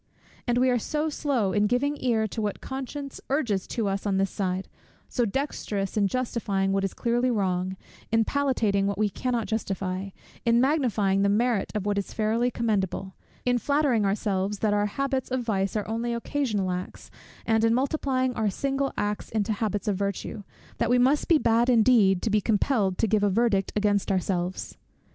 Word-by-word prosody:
And 240 0 +2
we 255 +1 +4
are 245 - +2
so 305 +7 -1
slow 265 -10 0
in 210 0 +3
giving 270 +6 +1
ear 230 -3 +2
to 225 - -4
what 210 -1 -2
conscience 270 +1 -6
urges 235 -9 0
to 225 -4 -2
us 195 +1 -2
on 195 -1 +1
this 195 0 +1
side; 190 -1 -2 0.4
so 245 - 0
dexterous 205 -5 -2
in 205 -2 +3
justifying 205 -5 -1
what 195 0 +1
is 195 - -2
clearly 240 +2 +1
wrong, 190 -4 -1 0.3
in 225 0 +3
palliating 225 -9 +1
what 200 - -2
we 210 0 +2
cannot 240 +1 -1
justify, 195 -3 -3 0.3
in 235 0 +4
magnifying 240 -8 +2
the 200 - +3
merit 225 0 +1
of 205 -2 -2
what 205 -1 +1
is 200 - -6
fairly 225 +3 +1
commendable, 195 -5 -1 0.3
in 245 -1 +2
flattering 280 -5 +2
ourselves 200 0 0
that 210 0 +1
our 205 0 +2
habits 265 +3 -2
of 255 -1 -1
vice 195 -3 -1
are 210 - -1
only 235 +2 -2
occasional 230 -6 -1
acts, 180 0 -6 0.3
and 225 0 +2
in 225 - +4
multiplying 260 -1 0
our 220 -3 0
single 275 +6 -1
acts 205 0 -2
into 215 0 0
habits 210 0 -2
of 200 -3 +1
virtue, 200 +1 -3 0.4
that 230 - +1
we 245 - +4
must 265 +4 +3
be 330 - +5
bad 235 -2 +2
indeed, 220 -6 +4
to 225 - 0
be 210 0 +3
compelled 205 -3 +1
to - - +2
give 215 -1 +2
a 205 - +3
verdict 200 -2 +1
against 205 -1 +1
ourselves. 185 -1 -2
220 Hz, 185 wpm, -26 LUFS, 200-250 Hz, 0.4 s, be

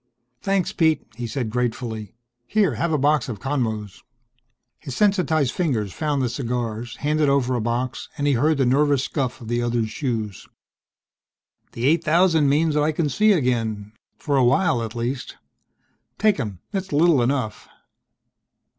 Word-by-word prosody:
"Thanks, 195 -2 0
Pete," 160 -3 +2
he 120 +1 -4
said 115 -2 -3
gratefully. 115 -3 -3 0.3
"Here, 200 - +2
have 160 +9 -1
a 155 - +2
box 145 0 +2
of 110 -5 -5
Conmos." 110 -6 -3 0.8
His 135 - -7
sensitized 175 -9 +2
fingers 120 - -1
found 145 -3 -1
the - - +1
cigars, 120 -2 -3
handed 150 0 +1
over 135 -2 +2
a 120 - 0
box, 120 +3 -2
and 145 - -1
he 145 - +3
heard 150 +5 +2
the 135 - +2
nervous 140 +1 +3
scuff 130 -4 -3
of 115 - -9
the 120 +1 0
other's 120 -2 -1
shoes. 110 - -3 1.3
"This 115 - -5
eight 160 +5 +3
thousand 165 -2 +3
means 155 +2 +2
I 150 +1 +2
can 155 -1 -1
see 215 +10 +3
again 115 - 0 0.2
for 145 -2 -1
a 130 - +4
while 125 0 +3
at 115 0 -5
least. 120 +3 -4 0.8
Take 215 -6 +2
'em! 105 -8 -4
It's 190 -1 -3
little 155 -2 +4
enough." 125 -3 -2
135 Hz, 155 wpm, -23 LUFS, 120-155 Hz, 1.3 s, a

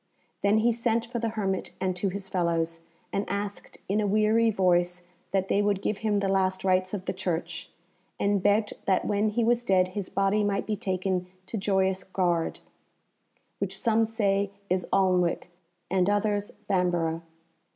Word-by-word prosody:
Then 200 +2 +4
he 230 +2 +4
sent 230 0 0
for 235 0 -4
the 230 0 -1
hermit 195 -2 -1
and 185 -1 0
to 190 +2 0
his 195 +1 -5
fellows, 165 -3 0 0.3
and 200 - +1
asked 200 0 -4
in 205 +3 +1
a 205 - +1
weary 215 +3 +3
voice 180 -3 +2 0.3
that 190 +1 0
they 200 - +2
would 205 -1 +1
give 200 +1 -2
him 210 -2 +1
the 195 - 0
last 190 -1 +1
rites 185 +1 +2
of 190 -2 -6
the - - -1
Church; 170 -2 -3 0.5
and 200 -1 +2
begged 205 +2 +2
that 190 -1 +2
when 210 +1 +1
he 230 +3 0
was 240 +1 +2
dead 185 -4 +3
his 190 0 -5
body 195 +2 +2
might 200 -1 0
be 215 - -1
taken 185 -1 -1 0.2
to - - -6
Joyous 190 -2 +1
Gard, 175 -3 0 1.0
which 195 -1 -2
some 225 +1 +2
say 200 -3 +1 0.2
is 185 -1 +1
Alnwick 180 -2 +2 0.4
and 185 +1 +2
others 205 0 +1 0.2
Bamborough. 175 -3 +1
195 Hz, 170 wpm, -27 LUFS, 185-210 Hz, 1.0 s, Then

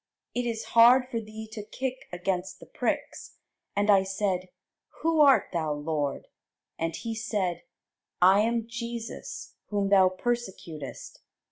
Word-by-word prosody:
it 245 0 -1
is 225 -1 -2
hard 240 +3 +8
for 230 - -1
thee 220 0 -9
to 215 - -5
kick 260 +4 -5
against 180 +1 -2
the - - -12
pricks. - - -3 0.4
And 205 +1 +1
I 195 -1 +6
said, 190 -1 -1 0.5
Who 325 -1 +2
art 280 -2 +6
thou, 160 -3 0
Lord? 145 -1 -2 0.5
And 165 0 -1
he 230 -1 -4
said, 205 -6 -2 0.6
I 190 +3 +6
am 230 +1 +1
Jesus 235 -1 -6
whom 200 -1 0
thou 190 -2 +6
persecutest. 185 - -5
205 Hz, 135 wpm, -28 LUFS, 180-235 Hz, 0.6 s, hard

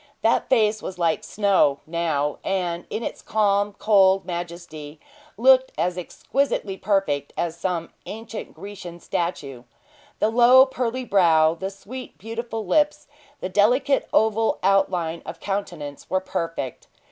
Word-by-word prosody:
That 225 - +2
face 215 -4 +3
was 185 - -6
like 170 -2 0
snow, 195 -9 +2
now; 155 -3 -1
and, 175 -3 -2
in 225 - -4
its - - -5
calm, 205 -1 +1
cold 195 -3 +4
majesty, 170 -4 -7 0.4
looked 260 +2 +5
as 180 +1 0
exquisitely 195 +3 -2
perfect 190 -9 -1
as 170 -1 -1
some 170 -1 -3 0.2
ancient 225 +1 -7
Grecian 180 -1 -9
statue. 145 -8 -3 0.6
The 215 - +1
low, 245 +3 +7
pearly 255 -1 -3
brow, 165 -6 +4
the 190 +3 -5
sweet, 240 +6 -10
beautiful 225 +1 -5
lips, 295 -1 +1 0.4
the 185 - -3
delicate 250 +8 +2
oval 220 0 +2
outline 180 -4 +1
of 165 +1 -8
countenance, 175 -8 -5
were 185 - +1
perfect. 165 -7 -4
195 Hz, 130 wpm, -23 LUFS, 170-225 Hz, 0.6 s, low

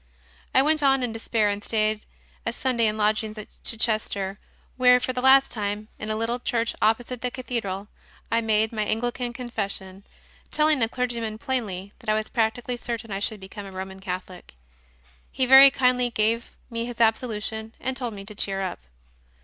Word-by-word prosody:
I 265 - +6
went 310 +1 +2
on 270 -2 +3
in 240 -2 -2
despair 225 -1 0
and 205 0 -3
stayed 215 -1 +2 0.4
a 230 - -1
Sunday 235 -2 +1
in 215 0 -1
lodgings 215 +1 0
at 215 - -8
Chichester, 215 -3 -1 0.4
where 250 -1 +6
for 255 - -2
the 250 - -2
last 265 +1 +6
time, 210 0 -2
in 215 - -5
a 215 - 0
little 230 +2 -1
church 230 -2 0
opposite 230 +3 +1
the 250 - 0
Cathedral, 225 -6 -4 0.4
I 230 0 +3
made 220 -1 +2
my 220 -2 -2
Anglican 240 +3 -2
Confession, 200 -6 -5 0.5
telling 305 -1 +3
the 225 -2 +2
clergyman 235 -3 -2
plainly 215 -7 -3
that - - -7
I 215 - +4
was 215 0 -2
practically 235 +2 -1
certain 230 -2 -5
I 195 - -2
should 210 +1 -1
become 195 +1 -9
a - - -9
Roman 190 0 -7
Catholic. 185 - -7 0.8
He 260 - +1
very 265 +2 +10
kindly 250 -2 +2
gave 230 +1 0 0.2
me 230 0 -2
his 240 0 -7
absolution 220 -1 0
and 260 +1 -2
told 245 -4 -4
me 195 0 -8
to 210 - -8
cheer 195 -1 -1
up. 185 - -4
225 Hz, 180 wpm, -25 LUFS, 210-245 Hz, 0.8 s, very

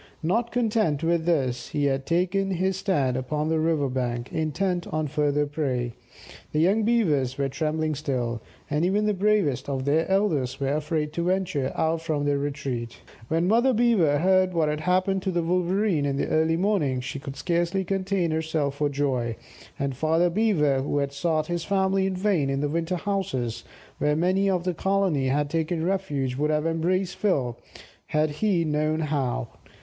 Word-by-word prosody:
Not 225 +8 0
content 215 - +1
with 165 0 +1
this, 135 -8 0
he 145 -1 -1
had 135 -1 0
taken 185 +3 +1
his 190 +1 0
stand 180 -10 0
upon 150 +4 -2
the 160 0 +1
river 155 -3 +1
bank, 125 -2 -3
intent 175 +3 -1
on 155 0 -1
further 150 0 +1
prey. 130 -5 -2 0.6
The 150 - +1
young 195 +7 +3
Beavers 160 - +1
were 140 -1 0
trembling 155 +2 -1
still, 125 -6 -2 0.3
and 150 +2 0
even 200 +4 +2
the 210 - +2
bravest 200 -10 +1
of 135 -1 -2
their 155 +5 +1
elders 165 -11 +1
were 135 0 0
afraid 150 0 -1
to 170 +1 -2
venture 180 -7 0
out 160 0 0
from 155 -3 -1
their 145 -1 +1
retreat. 135 -5 -4 0.3
When 165 +4 +1
Mother 240 +6 +4
Beaver 210 -11 +3
heard 185 +2 +3
what 160 -2 +2
had 150 0 -2
happened 185 +4 +1
to 190 - -2
the 170 -1 0
Wolverene 180 -2 +1
in 140 - -1
the - - -1
early 160 +1 +2
morning, 175 -9 +1
she 135 +2 -5
could 135 0 -7
scarcely 175 +5 0
contain 190 -2 0
herself 155 -3 -1
for 145 0 +1
joy, 130 -5 -1 0.4
and 140 -2 -2
Father 160 +5 +2
Beaver, 165 -10 +2
who 145 +1 -1
had 140 -1 0
sought 155 +1 0
his 170 0 -3
family 190 0 +1
in 190 - -2
vain 180 -7 +1
in 135 0 -1
the 145 - 0
winter 165 +3 -1
houses, 135 - -2 0.4
where 150 0 +2
many 185 +4 +2
of 180 -2 0
the 180 0 -1
colony 190 -6 +1
had 145 +2 +1
taken 160 +2 -1
refuge, 145 -9 -1
would 150 +2 +1
have 150 0 +1
embraced 175 +3 0
Phil 135 - 0 0.5
had 155 0 +1
he 175 +1 +1
known 155 +1 0
how. 140 - -1
160 Hz, 180 wpm, -25 LUFS, 140-185 Hz, 0.6 s, Mother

